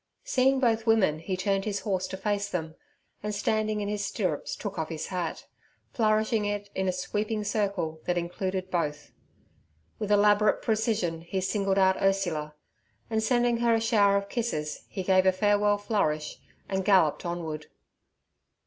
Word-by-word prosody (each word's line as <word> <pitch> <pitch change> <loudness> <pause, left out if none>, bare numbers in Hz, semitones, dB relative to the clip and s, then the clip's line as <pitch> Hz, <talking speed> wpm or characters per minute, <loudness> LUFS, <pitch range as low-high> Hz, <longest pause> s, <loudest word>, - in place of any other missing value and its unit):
Seeing 265 +1 +2
both 225 -3 +1
women 195 -9 +3
he 185 +3 -3
turned 195 +1 0
his 200 -1 -2
horse 190 -3 -1
to 190 - -6
face 205 +1 -1
them, 160 -4 -3 0.5
and 210 0 -3
standing 215 0 0
in 205 - -2
his 205 0 -2
stirrups 185 -8 -2
took 195 -4 -5
off 160 - -2
his 160 -1 -4
hat, 180 -3 -3 0.5
flourishing 215 -1 +2
it 205 0 -3
in 190 0 -1
a - - +3
sweeping 210 +4 -2
circle 195 -6 -1
that 180 0 0
included 185 +2 -3
both. 150 -4 -2 0.9
With 210 -2 -2
elaborate 210 +1 +4
precision 215 -7 0
he 170 +3 -3
singled 195 0 0
out 190 -1 +3
Ursula, 175 -6 0 0.6
and 220 0 +1
sending 240 +1 +2
her 235 -1 +3
a - - +2
shower 205 -3 +3
of 200 0 -3
kisses, 180 -11 -3
he 190 - -4
gave 185 0 +4
a - - +7
farewell 205 +2 +2
flourish 155 -8 -1 0.3
and 190 -1 -1
galloped 185 -6 +3
onward. 165 -3 -4
200 Hz, 160 wpm, -28 LUFS, 180-215 Hz, 0.9 s, a